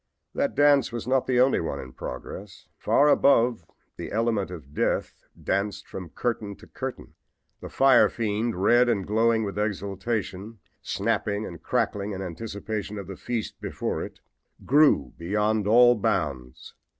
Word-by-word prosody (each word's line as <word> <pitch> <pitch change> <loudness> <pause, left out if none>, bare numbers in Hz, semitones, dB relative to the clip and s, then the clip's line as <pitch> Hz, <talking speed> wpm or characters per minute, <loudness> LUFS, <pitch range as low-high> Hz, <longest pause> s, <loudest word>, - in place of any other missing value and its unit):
That 280 0 -1
dance 145 -2 +4
was 120 0 -5
not 130 0 +1
the 125 -1 +2
only 130 +2 +4
one 80 - -3
in 65 -1 -9
progress. 95 +10 -8
Far 145 - +3
above 125 -5 +4 0.3
the - - -6
element 110 -3 0
of 75 -6 -10
death - - -1 0.2
danced 100 +1 -2
from 90 -3 -8
curtain 105 0 -3
to - - -16
curtain. - - -7 0.5
The - - -8
fire 135 -1 +5
fiend, 110 0 -2
red 120 +6 +4
and 100 -5 0
glowing 110 +2 +2
with 100 0 -4
exultation, 100 +1 -3 0.2
snapping 100 +1 -1
and 85 -2 -9
crackling 100 0 -1
in 95 - -5
anticipation 105 +3 -5
of 100 - -6
the 95 - -8
feast 115 +2 -5
before - - -3
it, - - -10 0.4
grew 140 - +4
beyond 105 +4 0
all 120 +3 +7
bounds. 70 - -3
105 Hz, 150 wpm, -26 LUFS, 95-120 Hz, 0.5 s, all